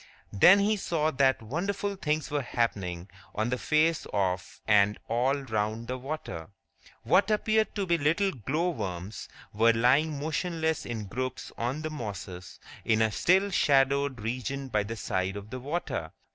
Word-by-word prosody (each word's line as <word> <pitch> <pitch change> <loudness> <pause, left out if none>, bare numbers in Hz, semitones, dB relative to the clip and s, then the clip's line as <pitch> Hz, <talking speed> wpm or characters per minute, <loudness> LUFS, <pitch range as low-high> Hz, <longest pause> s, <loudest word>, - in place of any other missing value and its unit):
Then 175 - +7
he 210 +2 +2
saw 160 -5 0
that 130 -3 +2
wonderful 195 - -2
things 155 -5 -2
were 145 -1 0
happening 100 -8 -2 0.3
on 110 +3 0
the 125 - 0
face 155 +1 +2
of 95 -2 -1
and 105 -1 +4
all 125 +4 +2
round 110 -4 -2
the 130 +1 -3
water. 125 - -6 0.5
What 195 +1 +3
appeared 215 0 +1
to 200 -2 -1
be 170 -2 +1
little 165 +7 +2
glow 155 - -1
worms 95 - -5 0.2
were 115 +2 +4
lying 140 +6 +3
motionless 160 +1 -1
in 110 -3 -4
groups 130 +5 -4
on 130 +6 -3
the 155 - -3
mosses 100 -9 -7 0.2
in 110 -1 +2
a 110 -1 +3
still 190 - +3
shadowed 140 - +2
region 130 +4 -3
by 105 -3 +1
the 110 +3 -5
side 95 -3 -2
of 100 +2 -9
the 130 - -5
water. 150 +7 -3
130 Hz, 160 wpm, -28 LUFS, 110-160 Hz, 0.5 s, Then